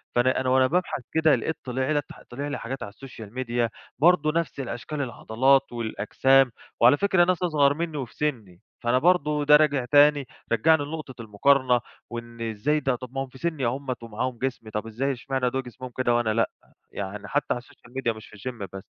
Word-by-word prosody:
فأنا 125 +2 +3
أنا 130 - 0
وأنا 130 0 +4
بابحث 175 -2 -1
كدا 160 -2 +4
لقيت 145 +7 -2
طِلع 130 +2 -2
لي 145 -1 +2 0.3
طِلع 140 +4 -5
لي 145 - -3
حاجات 130 +3 -5
على 100 - -7
الSocial 115 -3 -10
Media 120 -2 -1 0.3
برضو 155 -1 +4
نفس 165 -3 -2
الأشكال 135 +3 -4
العضلات 130 +2 +2
والأجسام، 120 +3 +2 0.3
وعلى 125 +5 +6
فكرة 190 -1 +3
ناس 185 0 0
أصغر 145 -5 +3
مني 160 0 -3
وفي 125 -5 -6
سني، 110 -12 -3 0.2
فأنا 120 +2 +2
برضو 150 -3 +2
ده 150 +1 +7
راجع 145 -4 +3
تاني، 145 -1 +5 0.2
رجَّعني 145 +7 +4
لنُقطة 145 -5 -7
المُقارنة، 125 +4 +3 0.3
وإن 115 0 -8
إزاي 115 +7 0
ده، 135 -3 0
طب 125 +1 -9
ما 135 0 -1
هُم - - -8
في 130 - -14
سني 155 -3 -2
أهُمَّة، 130 +2 -2
ومعاهم 115 +2 -4
جسم 125 -3 -4
طب 105 +1 -4
إزاي 130 +5 -1
إشمعنى 130 0 -1
دول 135 +1 -2
جسمهم 125 +1 -9
كده 120 -2 +2
وأنا 120 -2 +1
لأ؟ 115 +1 +2 0.4
يعني 100 +1 -6
حتى 145 +7 0
على 120 - -5
الSocial 130 -3 -20
Media 115 -4 0
مش 110 - -12
في - - -15
الGym 115 -2 -6
بس. 95 -1 -8
130 Hz, 195 wpm, -25 LUFS, 120-145 Hz, 0.4 s, ده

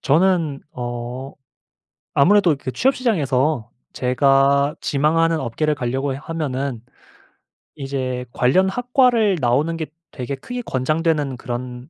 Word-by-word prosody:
저는 160 -2 +2
어 120 +2 -6 0.8
아무래도 175 +1 +4
그 130 -2 -5
취업 265 - +2
시장에서 145 - 0 0.2
제가 135 +2 +3
지망하는 160 +2 +1
업계를 150 +6 -1
가려고 135 +1 -2
하면은 140 -5 -3 0.9
이제 130 -2 -3
관련 180 +10 +3
학과를 245 -3 +2
나오는 145 +7 +1
게 160 - -3 0.3
되게 135 +1 -4
크게 245 - -6
권장되는 150 - 0
그런 125 +2 -6
140 Hz, 250 characters per minute, -21 LUFS, 130-165 Hz, 0.9 s, 아무래도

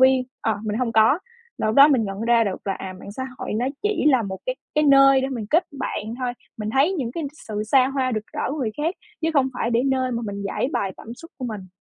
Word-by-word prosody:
viên, 260 0 +5 0.2
ờ, 220 -2 0
mình 215 +2 -2
hông 240 -2 -1
có. 220 +7 +5 0.4
Là - - 0
lúc 215 - +1
đó 280 +1 +9
mình 260 -7 +3
nhận 195 0 -5
ra 230 0 +3
được 195 -3 -3
là, 195 - +1
à, 190 -1 -6
mạng 200 - -9
xã 260 - -5 0.2
hội - - -4
nó 230 +4 0 0.2
chỉ 420 0 0
là 260 -5 +4
một 190 -2 -5
cái 255 - 0 0.2
cái 300 0 +3
nơi 275 -1 +7
để 265 - -1
mình 235 -6 -4
kết 330 +3 +4
bạn 225 -4 -3
thôi, 250 -1 -1 0.3
mình 215 0 -3
thấy 280 +9 +3
những 260 -10 -3
cái 335 - -4
n - - -2 0.2
sự 210 -1 -2
xa 255 +3 +4
hoa, 265 -2 -1
rực 215 0 -3
rỡ - - -4
của 295 - -3
người 235 -6 -1
khác, 320 +5 -1 0.3
chứ 320 - +2
không 275 -3 +3
phải 235 -1 -1
để 235 +1 +2
nơi 260 -1 +1
mà 235 0 -2
mình 200 0 -5
giãi 250 - -1
bày 195 -1 -1
cảm 230 - -9
xúc 330 +7 -13
của 255 - -3
mình. 195 -5 -7
250 Hz, 280 wpm, -23 LUFS, 215-275 Hz, 0.4 s, đó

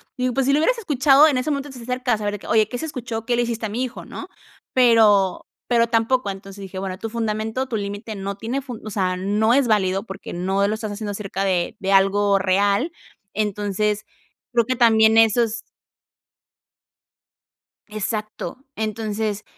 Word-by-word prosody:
digo, 250 0 0
pues, 270 - +1
si 275 - +3
lo 290 - +4
hubieras - - +2
escuchado, 290 - +5
en 280 -5 +1
ese 280 +5 -2
momento 280 0 -3
te 260 - -10
acercas 245 -2 -1
a - - -4
ver 205 - -1
de 205 - -5
que: - - -12
"Oye, 215 -1 +3
¿qué 245 - -4
se 320 - -4
escuchó?, 235 -6 -5
¿qué 245 - +1
le 240 - +2
hiciste 235 -2 -2
a - - -3
mi 235 +5 -2
hijo?", 255 - -6
¿no?, - - -8 0.5
pero 220 -6 +4 0.2
pero 235 -1 +3
tampoco, 230 0 +1
entonces 195 +1 -10
dije: 190 0 -7
"Bueno, 190 -1 -4
tu 225 - -4
fundamento 220 +2 -2
tu 245 - -3
límite 205 +2 -5
no 200 0 -4
tiene 230 +7 -3
fun 250 -4 -8
o - - -4
sea, 185 -3 -1
no 210 +5 +2
es 270 -1 +3
válido 195 -3 +1
porque 195 -4 -8
no 190 +3 0
lo 210 - 0
estás 220 -1 -5
haciendo 205 0 -4
acerca 195 -1 -4
de 185 +2 0
de 195 0 -1
algo 195 +1 +4
real", 200 - +2 0.4
entonces, 210 0 -1 0.5
creo 235 -2 +2
que 255 +2 -1
también 220 -2 +5
esos 225 +1 +3 2.3
Exacto, 215 +4 -5
entonces, 215 -1 -3
220 Hz, 185 wpm, -22 LUFS, 200-245 Hz, 2.3 s, escuchado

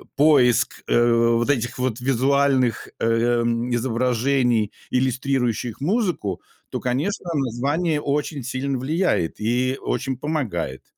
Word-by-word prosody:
поиск, 135 -6 +3
э, 120 0 +3 0.2
вот 120 +3 0
этих 120 -2 0
вот 125 -2 -1
визуальных, 130 -1 +1
эм, 120 +1 +1
изображений, 120 -1 +1 0.2
иллюстрирующих 125 -2 -1
музыку, 175 - -1 0.3
то - - -4
конечно 155 - -2
название 145 +5 0
очень 145 -1 -2
сильно 130 +2 -2
влияет 140 - -1
и 125 +4 0
очень 130 -1 -2
помогает. 125 - -3
130 Hz, 105 wpm, -22 LUFS, 120-140 Hz, 0.3 s, поиск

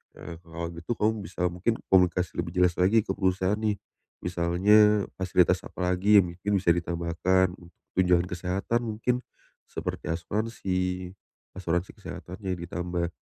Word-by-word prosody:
Eee, 85 -1 -9
kalau 85 0 -5
gitu 85 +5 -7
kamu 110 +1 +2
bisa 90 +1 -1
mungkin 90 +7 0 0.2
komunikasi 90 -2 +3
lebih 85 - -3
jelas 90 -1 +2
lagi 100 +5 +4
ke 95 - -3
perusahaan 95 +2 +1
nih. 110 -2 0 0.5
Misalnya, 100 +5 +4 0.2
fasilitas 90 -1 +3
apa 90 -1 -2
lagi 100 +4 +3
yang 85 - -4
mungkin 100 +4 -2
bisa 90 -3 +3
ditambahkan 85 +2 +1
untuk 85 0 -17 0.2
tunjangan 90 -2 +4
kesehatan 90 +6 -1
mungkin, 115 +3 0 0.5
seperti - - -5
asuransi, 90 -1 -2 0.5
asuransi 90 0 -1
kesehatannya 95 +1 -6
ditambah 85 0 -3
90 Hz, 135 wpm, -27 LUFS, 85-100 Hz, 0.5 s, lagi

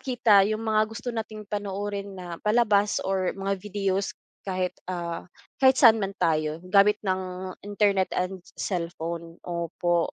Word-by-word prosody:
makita 235 -6 +4
yung 215 +1 -2
mga 215 -1 +3
gusto 235 +2 -5
nating 215 -1 -5
panoorin 200 -1 -4
na 175 -2 -7
palabas 210 -2 +3
or 190 -1 0
mga 195 0 -1
videos, 195 -1 -1 0.3
kahit 185 -1 -1 0.2
ah, 170 -1 -4 0.3
kahit 260 0 +6
saan 225 -3 +7
man 195 -1 -2
tayo, 155 -1 +1
gamit 200 +2 +5
ng 185 -1 -3
internet 200 -2 +2
and 185 0 -2 0.2
cellphone, 170 -2 -4
opo 170 0 0
195 Hz, 135 wpm, -26 LUFS, 180-210 Hz, 0.3 s, saan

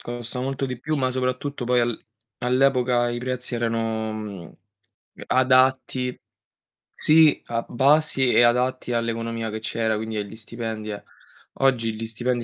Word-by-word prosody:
costa 120 +1 -5
molto 135 +1 -2
di 125 -2 -4
più, 155 +4 -2
ma 130 -2 0
soprattutto 130 +1 -2
poi 125 0 +2
al 120 -1 -1 0.4
all'epoca 125 -1 +2
i 120 - -3
prezzi 125 0 -3
erano 110 -5 -3 0.7
adatti 130 0 +2 0.8
sì, 155 -1 +4
a 115 0 -3
basi 135 0 +3
e - - +6
adatti 125 +1 +2
all'economia 115 -1 -2
che 110 +1 -4
c'era 110 0 -1
quindi 110 0 -4
agli 105 +1 -5
stipendi 110 -1 -6
eh 100 - -6 0.6
oggi 120 -5 +2
gli 115 - -5
stipendi 120 +2 -2
120 Hz, 135 wpm, -24 LUFS, 115-130 Hz, 0.8 s, e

